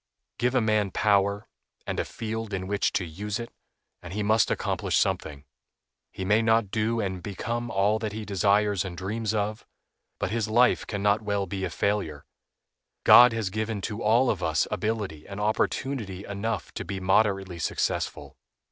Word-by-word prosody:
Give 125 +2 +1
a 130 - +4
man 110 -2 +2
power, 100 +1 +1 0.4
and - - -3
a - - 0
field 110 -2 -4
in 95 0 -4
which 100 +1 0
to 90 - 0
use 105 +7 -4
it, 115 - -7 0.5
and 90 0 -9
he 105 +1 -2
must 110 +1 +3
accomplish - - 0
something. 75 -2 -1 0.7
He 95 - -5
may 105 +3 +4
not 110 -3 +2
do 115 +2 0
and 95 -4 -2
become 115 +5 -4
all 105 +1 +2
that 110 -2 -3
he 110 0 -6
desires 100 0 +2
and 90 -3 -7
dreams 105 +4 -2
of, 105 +1 -2 0.5
but - - -2
his 115 -1 0
life 120 +3 +3
can 100 -2 -3
not 105 +1 +3
well 100 -2 -1
be 95 0 -3
a - - -3
failure. 80 -5 -2 0.8
God 125 0 +9
has 110 -4 -2
given 110 +1 -2
to 105 +3 -4
all 120 +4 +4
of - - -4
us - - +1
ability 105 -8 -3
and 100 +1 -7
opportunity 105 -1 -1
enough 100 +3 -3
to - - -4
be 95 +2 -5
moderately 95 -2 +1
successful. - - -2
105 Hz, 175 wpm, -27 LUFS, 95-110 Hz, 0.8 s, God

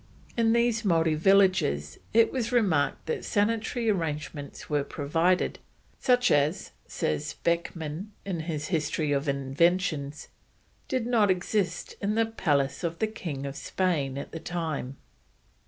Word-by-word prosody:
In 230 -1 +3
these 235 -1 +2
Maori 165 -5 +3
villages 175 - +3
it 230 +1 +5
was 240 -3 -2
remarked 190 -12 +2
that 160 - -2
sanitary 225 +3 0
arrangements 150 -7 -3
were 145 -2 +1
provided, 165 +6 0 0.4
such 245 -1 +3
as, 145 +4 +1 0.2
says 145 - -2
Beckmann 170 +1 -1 0.2
in 185 -4 -2
his 155 -2 -3
History 155 -2 0
of 140 +1 0
Inventions, 145 +2 0 0.6
did 255 -3 -1
not 230 -4 +3
exist 185 -1 0
in 205 +1 0
the 225 0 +3
palace 145 -10 0
of 170 -1 -2
the 220 - +1
King 165 -11 -5
of 140 0 -5
Spain 145 -7 -1
at 140 - -6
that 165 - -7
time. 155 -6 -3
170 Hz, 135 wpm, -28 LUFS, 145-205 Hz, 0.6 s, it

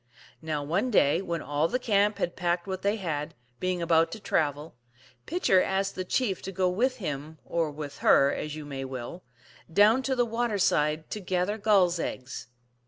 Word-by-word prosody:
Now, 155 -2 -2
one 175 - 0
day 165 - +3
when 170 -4 -3
all 145 +2 0
the 250 - 0
camp 210 -4 +2
had 175 - -2
packed 175 -1 -1
what 190 -1 -4
they 200 +2 +1
.had, 155 -8 -4 0.2
being 185 -1 -1
about 165 0 +3
to 225 - -7
travel, 150 -5 -1 0.5
Pitcher 305 - +3
asked 195 +1 0
the 185 - -4
chief 195 0 -1
to 195 - -6
go 185 0 +1
with 250 +8 0
him, 155 - -5
or 165 -2 0
with 145 -1 -7
her, 140 +1 +5
as 150 0 -4
you 155 -1 -7
may 135 -2 -5
will, 130 +6 -6 0.5
down 210 +8 +5
to 265 0 -1
the 245 -1 +2
water 230 -1 -1
side 155 -4 +1
to 215 - -3
gather 185 +2 -1
gulls 190 -5 +3
eggs. 130 -4 -5
180 Hz, 185 wpm, -28 LUFS, 150-205 Hz, 0.5 s, her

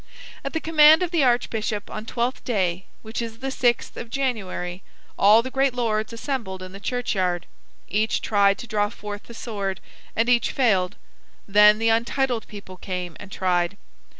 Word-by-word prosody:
At 275 - -4
the 320 - 0
command 315 +1 +6
of 350 - -2
the 335 -5 +2
archbishop 225 -4 0
on 215 +1 -6
Twelfth 240 +2 -2
day, 185 -6 -1 0.2
which 220 +2 -4
is 225 -1 -6
the 265 +2 -4
sixth 245 -2 0
of 235 - -7
January, 195 -9 -3 0.3
all 215 +3 +6
the 260 - -6
great 270 -1 +1
lords 220 -3 -1
assembled 230 -6 -4
in 185 - -9
the 195 - -10
churchyard. 190 -7 -1 0.4
Each 215 +2 0
tried 200 -2 +3
to - - -8
draw 210 -3 0
forth 210 -1 -8
the 235 - -11
sword, 200 -5 -4 0.4
and 225 +1 +2
each 245 -1 +3
failed. 195 -9 +2 0.5
Then 210 +1 +6
the 225 +1 +1
untitled 235 +1 0
people 200 -3 -10
came 180 -2 -5
and 200 -1 -11
tried. 180 0 0
220 Hz, 170 wpm, -24 LUFS, 195-245 Hz, 0.5 s, command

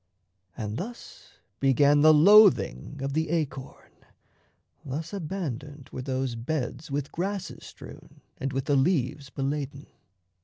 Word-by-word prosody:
And 105 -2 -4
thus 235 - -9 0.3
Began 140 +2 +4
the 155 +1 +8
loathing 165 - +5
of 135 0 -2
the 160 +1 0
acorn; 150 -5 -4 0.9
thus 155 +7 -5
Abandoned 150 - -5
were 130 - -5
those 130 -1 -2
beds 125 +5 -4
with 140 0 -3
grasses 195 +2 -4
strewn - - -13 0.2
And 135 - -2
with 135 0 -2
the 145 - +2
leaves 140 -2 0
beladen. 140 +1 -4
145 Hz, 120 wpm, -27 LUFS, 135-160 Hz, 0.9 s, the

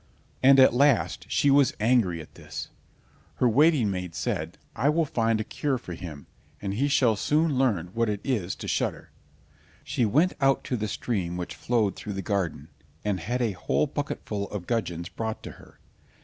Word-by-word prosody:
And 135 +1 +7
at 130 - +7
last 120 -7 +2
she 140 +3 +3
was 140 -1 +4
angry 105 -7 +2
at 75 - -14
this. - - -7 0.7
Her 125 - +2
waiting 135 -2 +4
maid 90 -3 -5
said, - - -3 0.2
"I 130 +6 +2
will 160 +2 +2
find 115 -5 +1
a - - -1
cure 135 +4 -2
for 90 -7 -8
him; 80 -5 -8 0.3
he 100 +8 -1
shall 125 -5 +3
soon 150 +7 +1
learn 100 -10 +1
what 115 -1 +1
it 105 -1 -1
is 105 -10 -1
to - - -8
shudder." - - -2 0.7
She 135 -2 -1
went 150 - +3
out 135 0 +3
to 125 - -2
the 110 -2 -2
stream 95 -5 -2
which 90 - -5
flowed 110 -6 0
through 105 - -6
the 95 0 -4
garden, 85 -8 -2 0.4
and 100 -3 0
had 120 +9 -1
a 115 - +1
whole 100 - 0
bucketful 125 -8 -4
of 100 -4 -5
gudgeons 90 -7 -2
brought 110 +2 -5
to - - -7
her. - - -18
110 Hz, 180 wpm, -26 LUFS, 95-135 Hz, 0.7 s, And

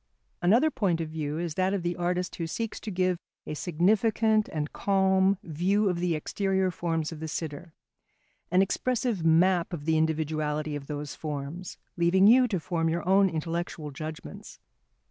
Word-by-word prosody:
] - - -45
Another 235 - +4
point 185 - 0
of 160 -1 -3
view 155 -1 -3
is 170 -1 -3
that 185 +4 +1
of 190 - -3
the 175 0 -1
artist 180 +1 -2
who 165 - -3
seeks 225 +6 -4
to - - -6
give 185 -2 0 0.3
a - - -5
significant 215 +7 +2
and 150 -1 -3
calm 190 0 +2
view 185 +6 +1
of 175 -2 -1
the 175 -2 0
exterior 190 +4 0
forms 165 -2 -2
of 160 - -8
the 160 - -5
sitter, 155 +1 -6 0.7
an 185 +2 +4
expressive 235 -1 -1
map 175 +2 +3
of 145 -4 -5
the 160 0 +2
individuality 155 -1 -1
of 140 -1 -7
those 145 -1 -5
forms, 150 +4 -6 0.2
leaving 175 +3 +4
you 250 +4 +7
to 195 -6 -1
form 165 -1 -1
your 170 +2 -2
own 195 +1 +5
intellectual 165 -1 -4
judgments. 155 +2 -8
175 Hz, 170 wpm, -28 LUFS, 155-190 Hz, 0.7 s, you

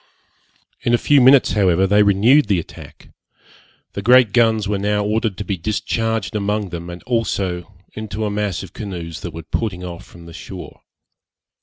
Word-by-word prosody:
In 120 - +2
a - - +2
few 145 +2 +3
minutes, 130 +1 +6
however, 95 -3 +2
they 105 +2 +4
renewed 105 +7 +4
the 100 -3 +2
attack. 85 - -10 0.8
The 100 - -4
great 120 -1 +5
guns 110 -3 +3
were 100 -1 -1
now 105 +1 0
ordered 110 -2 -1
to 105 - -5
be 100 - -2
discharged 110 +3 -2
among 105 -1 -1
them, 85 0 -7
and 85 0 -9
also 100 -6 -2 0.2
into 110 0 -4
a 105 - -2
mass 105 -4 -2
of 95 - -12
canoes 85 - -6
that - - -5
were 80 - -8
putting 90 +2 -3
off 85 -2 -7
from 85 -1 -15
the 85 - -12
shore. - - -10
105 Hz, 175 wpm, -19 LUFS, 90-110 Hz, 0.8 s, minutes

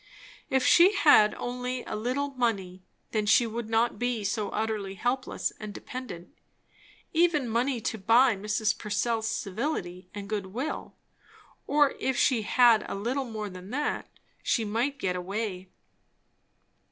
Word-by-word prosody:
If 265 -1 +2
she 370 +4 +6
had 255 - +6
only 250 +1 -4
a - - -5
little 255 +6 -1
money, 200 -8 -2 0.3
then 215 -2 0
she 235 +3 +5
would 230 0 -5
not 225 -1 +1
be 245 -3 -1
so 205 +1 -1
utterly 210 -3 -2
helpless 255 +5 -2
and 210 -2 -7
dependent; 250 - -8 0.8
even 320 -5 +3
money 240 +3 0
to 220 0 -3
buy 230 +4 +5
Mrs. 210 +2 0
Purcell's 220 +2 -1
civility 195 - -3
and 205 -1 -7
good 205 -2 -3
will; 255 +11 -5 0.7
or 290 -1 +4
if 265 -1 -1
she 245 -4 +3
had 230 0 +5
a - - -3
little 245 +7 -2
more 215 -3 -5
than 185 0 -10
that, 290 +5 -2 0.3
she 230 - 0
might 235 +7 -1
get 185 -8 -1
away. 190 0 -4
225 Hz, 140 wpm, -28 LUFS, 205-255 Hz, 0.8 s, she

